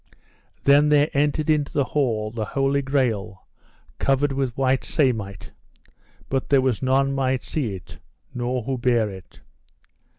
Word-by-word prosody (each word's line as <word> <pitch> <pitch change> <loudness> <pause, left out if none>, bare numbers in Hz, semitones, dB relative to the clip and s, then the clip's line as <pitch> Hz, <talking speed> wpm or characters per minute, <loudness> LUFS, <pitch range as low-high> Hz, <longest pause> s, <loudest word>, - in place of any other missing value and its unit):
Then 145 +2 +5
there 150 0 +3
entered 150 +2 +1
into 150 -2 +1
the 145 - +1
hall 115 -6 -1
the 115 -1 -3
Holy 135 +5 0
Grail 115 -8 -1 0.5
covered 135 +1 +1
with 135 -3 -2
white 130 -1 +1
samite, 110 -9 -1 0.8
but 135 -1 -2
there 140 - +5
was 130 -4 0
none 135 +1 +2
might 130 -1 0
see 120 -11 -3
it, 90 - -12 0.3
nor 125 0 -2
who 130 +1 -3
bare 120 -4 +1
it. 95 -2 -13
130 Hz, 140 wpm, -23 LUFS, 115-140 Hz, 0.8 s, Then